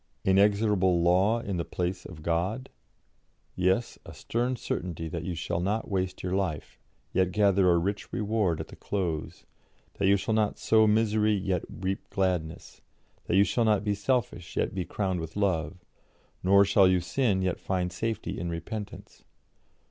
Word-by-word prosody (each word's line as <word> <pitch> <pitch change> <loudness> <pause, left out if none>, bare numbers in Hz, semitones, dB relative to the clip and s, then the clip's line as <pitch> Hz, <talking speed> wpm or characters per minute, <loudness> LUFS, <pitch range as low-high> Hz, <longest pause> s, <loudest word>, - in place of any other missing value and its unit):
'Inexorable 100 -2 +3
law 95 +7 +3
in 100 -5 -3
the 85 - -1
place 90 +2 -3
of 80 -4 -11
God'? 90 +11 -1 0.8
Yes; 95 +6 0
a - - -11
stern 120 +2 -1
certainty 85 -7 -4
that 85 +1 -5
you 90 - -3
shall 85 +1 -2
not 105 +5 -1
waste 95 -1 -2
your 90 - -2
life, 95 -6 -3 0.3
yet 95 -1 +2
gather 100 -2 +3
a 85 - +4
rich 100 +4 -2
reward 105 -6 0
at - - -6
the - - -11
close; 85 -6 -4 0.5
that 100 - +2
you 100 +1 +5
shall 110 +3 -2
not 110 -1 +1
sow 110 -1 +4
misery, 110 0 +2
yet 95 -3 -1
reap 95 +1 -4
gladness; 90 -4 -2 0.4
that - - 0
you 100 - +6
shall 120 +3 +1
not 105 -2 +2
be 105 -1 0
selfish, 100 - -2
yet - - 0
be 95 -2 -3
crowned 95 -3 -2
with 80 -1 -7
love; 90 -4 -1 0.6
nor 100 +2 +5
shall 100 -1 +5
you 90 0 +3
sin, 95 +2 0
yet 90 -2 -1
find 90 -2 -2
safety 110 +3 -3
in 85 - -3
repentance. 100 +5 -7
95 Hz, 165 wpm, -28 LUFS, 90-105 Hz, 0.8 s, you